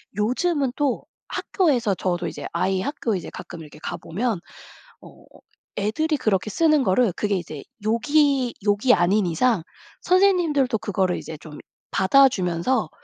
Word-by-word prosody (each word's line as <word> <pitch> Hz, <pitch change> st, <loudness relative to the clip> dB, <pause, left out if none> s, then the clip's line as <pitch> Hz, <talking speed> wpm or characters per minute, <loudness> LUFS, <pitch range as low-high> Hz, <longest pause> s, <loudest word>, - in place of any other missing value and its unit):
요즘은 260 Hz, -, 0 dB
또 280 Hz, -5 st, 0 dB, 0.2 s
학교에서 255 Hz, -, 0 dB
저도 175 Hz, -2 st, -2 dB
이제 -, -, -7 dB
아이 190 Hz, +3 st, 0 dB
학교에 230 Hz, -4 st, -2 dB
이제 175 Hz, -, -7 dB
가끔 175 Hz, -1 st, -9 dB
이렇게 150 Hz, -1 st, -13 dB
가보면 210 Hz, +4 st, -3 dB, 0.6 s
어 -, -, -16 dB, 0.5 s
애들이 295 Hz, +10 st, 0 dB
그렇게 215 Hz, -4 st, 0 dB
쓰는 305 Hz, +4 st, +3 dB
거를 210 Hz, -1 st, +2 dB
그게 205 Hz, -1 st, 0 dB
이제 155 Hz, -6 st, -6 dB, 0.2 s
욕이 265 Hz, +2 st, +2 dB
욕이 205 Hz, +5 st, +3 dB
아닌 190 Hz, +3 st, +2 dB
이상 185 Hz, +3 st, +1 dB, 0.4 s
선생님들도 345 Hz, -, +3 dB
그거를 190 Hz, -4 st, -1 dB
이제 155 Hz, -, -8 dB
좀 150 Hz, -1 st, -12 dB, 0.3 s
받아주면서 190 Hz, -, +2 dB
220 Hz, 305 characters per minute, -23 LUFS, 185-275 Hz, 0.6 s, 쓰는